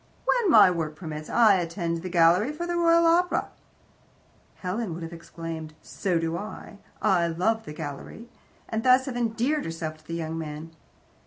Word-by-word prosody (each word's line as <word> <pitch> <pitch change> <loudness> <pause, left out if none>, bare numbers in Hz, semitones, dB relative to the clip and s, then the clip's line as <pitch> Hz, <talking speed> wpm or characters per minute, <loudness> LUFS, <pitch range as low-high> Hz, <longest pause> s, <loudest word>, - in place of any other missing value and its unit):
"When 475 -6 +2
my 205 - +7
work 160 -3 -3
permits, 155 -2 -7
I 220 -5 +5
attend 170 -1 -3
the 185 - -5
gallery 175 - +4
for, 325 +3 -5
the 345 0 -2
Royal 335 0 +4
Opera." 350 +2 +2 1.1
Helen 185 -1 -3
would 170 - -7
have 165 +1 -7
exclaimed, 165 -2 -8
"So 185 -3 -1
do 165 0 -1
I. 205 +1 -9 0.2
I 185 -5 +3
love 220 +7 0
the 150 - -7
gallery," 150 +9 -8 0.4
and 220 0 -2
thus 255 +1 +5
have 265 -3 -5
endeared 245 +5 0
herself 165 -1 -5
to 155 - -25
the 165 - -4
young 165 -1 -4
man. 155 +1 -7
180 Hz, 170 wpm, -26 LUFS, 165-235 Hz, 1.1 s, my